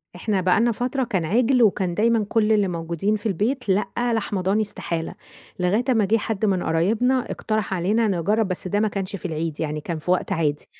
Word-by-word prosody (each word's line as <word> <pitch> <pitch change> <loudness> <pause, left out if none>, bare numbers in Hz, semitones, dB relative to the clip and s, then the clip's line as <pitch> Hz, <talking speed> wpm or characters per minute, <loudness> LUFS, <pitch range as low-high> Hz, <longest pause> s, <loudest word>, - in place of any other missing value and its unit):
إحنا 195 +1 -1
بقى 185 +4 +3
لنا 235 +1 +3
فترة 250 +4 -1
كان 195 -9 -1
عِجل 245 +7 +3
وكان 190 -4 +2
دايمًا 225 +2 +2
كل 220 -1 +2
اللي 205 -3 +3
موجودين 170 +4 -1
في 210 - -7
البيت 220 +4 -1
لأ، 210 +5 0
لحمة 205 -4 -1
ضاني 195 +4 +1
استحالة. 170 -5 -3 0.5
لغاية 195 +7 +1
أمّا 225 -5 +3
جه 225 +4 +3
حد 215 0 -2
من 190 -3 +1
قرايبنا 225 +11 +1
اقترح 215 -3 -2
علينا 210 +6 +1
نجرب 200 +3 +1
بس 185 0 -3
ده 205 +3 0
ما 215 - +2
كانش 195 -1 -4
في 190 - -9
العيد 160 -2 -3
يعني 150 -1 -2
كان 165 0 -4
في 180 - -2
وقت 185 - 0
عادي، 150 -4 -1
200 Hz, 205 wpm, -23 LUFS, 180-225 Hz, 0.5 s, بقى